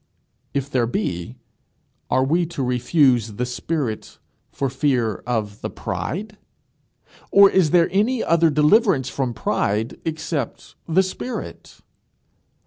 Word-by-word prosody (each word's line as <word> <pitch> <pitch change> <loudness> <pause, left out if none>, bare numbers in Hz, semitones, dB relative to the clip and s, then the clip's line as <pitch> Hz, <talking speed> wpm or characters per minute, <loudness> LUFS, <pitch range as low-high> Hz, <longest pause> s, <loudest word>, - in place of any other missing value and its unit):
If 140 -1 -1
there 125 -5 0
be, 120 - -3 0.7
are 130 - +3
we 165 +5 +1
to 150 -5 -4
refuse 125 -2 +2
the 125 +5 -2
spirit 125 -2 -4 0.3
for 140 - -2
fear 125 -5 0
of 105 -4 -2
the - - -3
pride? 210 - -5 0.9
Or 200 0 +8
is 185 -5 +3
there 170 +1 +4
any 220 +6 +1
other 165 0 +3
deliverance 150 - +3
from 125 -4 -2
pride 110 0 -1
except 160 -4 -4
the 180 +3 +3
spirit? 215 +6 -7
140 Hz, 120 wpm, -22 LUFS, 125-170 Hz, 0.9 s, Or